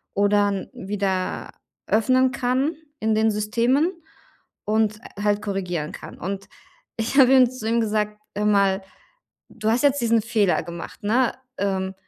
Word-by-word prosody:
oder 205 0 +3
n 195 -1 -4
wieder 190 -1 -2 0.4
öffnen 255 +4 +3
kann 265 +4 0 0.3
in 220 0 +1
den 220 +1 +3
Systemen 235 - +1 0.7
und, 215 0 +1 0.2
äh, - - -5
halt 205 0 +2
korrigieren 180 -7 -3
kann. - - -10
Und 195 +2 -5 0.5
ich 230 +4 -2
habe 265 0 +7
ihm 255 -2 +6
zu 255 -4 -6
ihm 235 0 +2
gesagt: 210 -1 -1 0.2
„Hör 210 +1 -1
mal, 200 -2 +3 0.7
du 215 -1 -3
hast 235 +4 +2
jetzt 285 0 +3
diesen 230 -1 +3
Fehler 210 -4 +1
gemacht, 170 0 -8
ne? 235 +4 +2 0.3
Ähm, 190 -1 -1
210 Hz, 150 wpm, -23 LUFS, 200-235 Hz, 0.7 s, habe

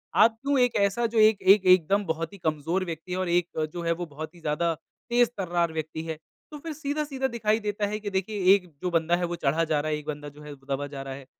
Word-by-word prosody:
आप 225 0 +5
क्यों 280 0 +1
एक 245 -1 +3
ऐसा 200 +4 +2
जो 230 0 -2
एक 215 -2 +5
एक 195 +1 +5
एकदम 185 +2 +4
बहुत 165 +4 -3
ही - - -10
कमज़ोर 165 +3 -1
व्यक्ति 170 +2 -5
और 185 -1 -1
एक 175 0 +2 0.2
जो 175 - -4
है 170 - +1
वो 175 +1 -5
बहुत 155 +2 -8
ही - - -15
ज़्यादा 165 +3 0 0.4
तेज़-तर्रार 190 -9 +1
व्यक्ति 160 0 -4
है, 160 -1 -5 0.3
तो 300 - -7
फ़िर 320 +1 -6
सीधा-सीधा 285 -2 -2
दिखाई 220 -3 0
देता 210 -1 -2
है 210 +1 -3
कि 205 -1 -4
देखिए 195 +1 -2
एक 190 - -3 0.2
जो 180 - 0
बंदा 165 0 +2
है 175 0 -1
वो 175 0 -3
चढ़ा 155 +2 +1
जा 155 -2 +1
रहा 155 +1 -2
है, 150 - 0
एक 150 - -10
बंदा 145 -1 -5
जो 145 +1 -16
है 150 - -8
वो 135 -1 -18
दबा 145 +1 -4
जा 140 -1 -7
रहा 135 0 -6
है। 135 0 -10
180 Hz, 260 wpm, -26 LUFS, 160-210 Hz, 0.4 s, आप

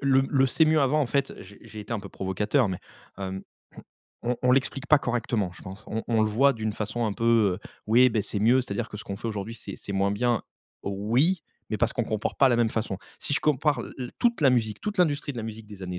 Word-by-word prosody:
le 135 -1 +4
le: 135 -2 +3
«c'est 160 +5 +3
mieux 155 -1 +3
avant» 140 +3 +3
en 140 - +2
fait 140 +3 0
j'ai 100 +1 -14
j'ai 110 - -9
été 105 +3 -7
un 115 - 0
peu 100 - -8
provocateur 105 +7 0
mais, 90 - -3 0.4
hem, 95 0 -4 0.8
on 120 0 0
on 125 - +4
l'explique 135 +1 0
pas 155 - +7
correctement 120 -6 -1
je - - -14
pense, 95 +3 -9
on 110 +1 -3
on 115 -2 +3
le 110 - +2
voit 135 +6 +4
d'une 110 -3 -3
façon 110 +3 -3
un 105 - -1
peu, 115 -5 +3
heu: - - -10 0.2
«oui, 125 +3 +6
ben 110 -2 0
c'est 105 - -2
mieux, 120 +4 +5
c'est-à-dire 100 -5 -3
que - - -8
ce 105 - -6
qu'on 100 - -5
fait 115 - -6
aujourd'hui 105 +1 -4
c'est 100 -4 -8
c'est 100 - -7
moins 100 +1 +1
bien.» 120 +1 +1 0.4
oui, 120 - +1 0.3
mais 110 - -1
parce 120 0 +2
qu'on 120 - -1
compare 110 -1 -2
pas 135 - +6
la 120 - +3
même 115 -2 +2
façon. 110 -4 -2 0.2
Si - - -3
je - - +1
compare 150 0 +2
l - - -7
l 125 -1 -5
toute 235 -6 +2
la 140 - +6
musique 110 -4 0
toute 210 -2 -4
l'industrie 145 -4 +1
de 120 - -7
la 115 - -3
musique 110 -1 -7
des 105 -2 -11
années 90 -1 -4
115 Hz, 260 wpm, -26 LUFS, 105-135 Hz, 0.8 s, pas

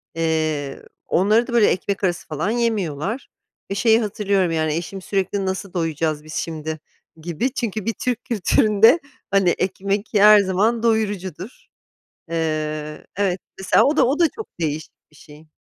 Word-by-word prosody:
Eee, 155 -4 -1 0.2
onları 215 +6 +3
da 240 - -6
böyle 230 -3 +5
ekmek 195 +2 -1
arası 180 -1 -1
falan 155 +6 -2
yemiyorlar 220 - -2 0.4
ve - - -1
şeyi 225 +2 +4
hatırlıyorum 200 -4 0
yani, 155 -1 0
eşim 180 +3 -5
sürekli 195 +1 -1
"Nasıl 190 0 -4
doyacağız 160 -3 -1
biz 155 0 -10
şimdi?" 160 -1 -4 0.4
gibi 175 - -2
çünkü 215 -5 -3
bir 230 - 0
Türk 245 0 -3
kültüründe, 215 - +4 0.3
hani 195 -3 +4
ekmek, 195 +3 -1
ki 210 -4 0
her 210 0 +9
zaman 205 +4 +1
doyurucudur. 205 - -2 0.6
Eee, 155 -2 -3
evet 190 -2 0 0.2
mesela 190 - +4
o 295 +3 +2
da, - - +5
o 280 +5 0
da 340 - +5
çok 440 - -7
değişik 155 -1 -3 0.2
bir - - -22
şey. 155 +1 -16
190 Hz, 155 wpm, -21 LUFS, 160-215 Hz, 0.6 s, her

